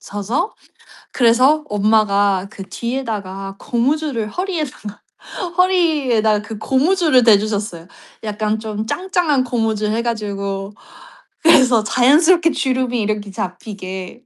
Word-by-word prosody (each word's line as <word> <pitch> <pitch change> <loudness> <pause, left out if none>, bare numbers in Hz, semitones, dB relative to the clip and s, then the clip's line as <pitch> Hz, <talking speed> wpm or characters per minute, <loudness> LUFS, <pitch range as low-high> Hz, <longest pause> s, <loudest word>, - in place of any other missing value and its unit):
서서. 225 - -3 0.6
그래서 255 +5 +3
엄마가 205 -2 +2
그 195 - -8
뒤에다가 205 -6 -5
고무줄을 255 -2 -1
허리에다가, 305 - -5 0.6
허리에다가 295 - +2
그 215 +1 -8
고무줄을 290 - +2
대주셨어요. 205 -5 +1 0.4
약간 215 0 -2
좀 215 -1 -5
짱짱한 355 - 0
고무줄 220 -3 -1
해 225 +2 0
가지고. 200 -3 -4 0.7
그래서 255 -8 +5
자연스럽게 320 - +4
주름이 255 -4 -1
이렇게 210 -1 -2
잡히게. 190 +3 -7
225 Hz, 280 characters per minute, -18 LUFS, 205-270 Hz, 0.7 s, 그래서